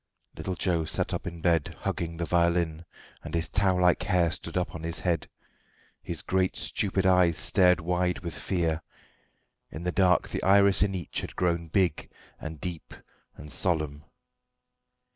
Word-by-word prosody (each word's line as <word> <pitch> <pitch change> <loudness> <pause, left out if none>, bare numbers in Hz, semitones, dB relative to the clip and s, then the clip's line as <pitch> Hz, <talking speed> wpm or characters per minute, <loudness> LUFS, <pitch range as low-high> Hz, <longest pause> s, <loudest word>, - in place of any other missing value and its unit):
Little 95 - -4
Joe 85 -3 0
sat - - -1
up - - -4
in 85 -2 -7
bed, 85 -3 +1
hugging 85 -1 -3
the 85 - -2
violin, 85 -1 +1 0.4
and - - -5
his 85 0 0
tow 95 -2 +2
like 90 -1 +3
hair 90 -4 +2
stood - - -5
up 90 - -1
on 80 - -7
his 85 +1 -1
head. 85 -2 -1 0.7
His - - -5
great 95 0 0
stupid 95 -1 -1
eyes 90 -3 +4
stared 90 -2 +4
wide 90 +1 0
with 85 -2 -5
fear; 85 -4 -1 0.9
in 80 - -8
the 90 - -1
dark 90 -1 +3
the - - -3
iris 100 0 +5
in 100 -1 +2
each 85 -4 -4
had - - -8
grown 85 -2 0
big, 85 -1 0 0.3
and 80 -1 -7
deep, 85 -1 -6 0.4
and 75 0 -11
solemn. 75 -5 -1
85 Hz, 160 wpm, -28 LUFS, 80-90 Hz, 0.9 s, iris